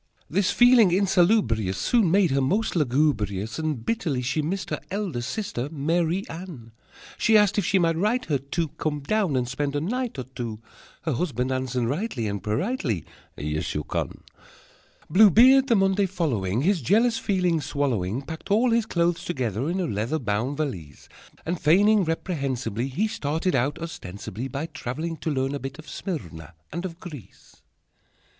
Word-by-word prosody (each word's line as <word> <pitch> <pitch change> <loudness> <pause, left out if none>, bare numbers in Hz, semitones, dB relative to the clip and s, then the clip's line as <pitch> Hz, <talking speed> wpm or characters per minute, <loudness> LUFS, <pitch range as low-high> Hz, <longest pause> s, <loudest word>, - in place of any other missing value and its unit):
_] - - -33
This 195 +4 +1
feeling 245 -5 +6
insalubrious 175 - +2
Soon 220 - +2
made 185 -2 +3
her 135 0 +2
most 200 +13 0
lugubrious, 120 - 0
And 150 -8 -2
bitterly 155 - -1
she 130 +5 0
missed 180 +6 -3
her - - -1
Elder 190 -10 -2
sister 130 - -3
Marie 165 +5 0
Anne: 160 -10 -9 0.5
She 225 -1 +5
asked 210 0 +3
if 195 - -1
she 195 - +3
might 165 -2 +2
write 220 +8 +1
her 145 -4 0
to 155 +4 -2
Come 150 0 -3
down 190 0 0
and 125 -1 0
spend 140 +3 -2
a - - +1
night 240 - -2
or 130 - -3
two, 120 -4 -6 0.4
Her 160 - -1
husband 130 -3 -1
answered 130 -2 -1
rightly 140 - -2
And 100 -2 -3
politely: 110 - -1 0.3
"Yes, 75 +1 -3
you 75 - -1
can!" - - -4 0.8
Blue 205 +6 +7
Beard, 260 +7 +6
the 235 - +4
Monday 195 0 +2
following, 125 - -1
His 190 -1 +2
jealous 225 - +3
feeling 180 -6 +1
swallowing, 130 -6 -1
Packed 160 +2 -8
all 230 +4 +3
his 230 -1 +2
clothes 175 -2 0
together 130 - -2
In 180 +2 -1
a 185 - 0
leather 115 +3 -1
Bound 120 +3 -2
valise, 95 - -5 0.4
And, 175 +1 -2
feigning 200 +6 +5
reprehensibly, 135 - -2
He 180 +12 0
started 160 -2 -1
out, 135 +5 +1
ostensibly 110 - -6
By 140 +3 -4
traveling 160 +3 -5
to 160 - -3
learn 135 -1 0
a 140 - -3
Bit 135 +1 -6
of 155 -1 -12
Smyrna 90 - -6 0.2
And 170 +3 -3
of 170 -2 -7
Greece. 145 - -12
155 Hz, 170 wpm, -25 LUFS, 125-190 Hz, 0.8 s, Blue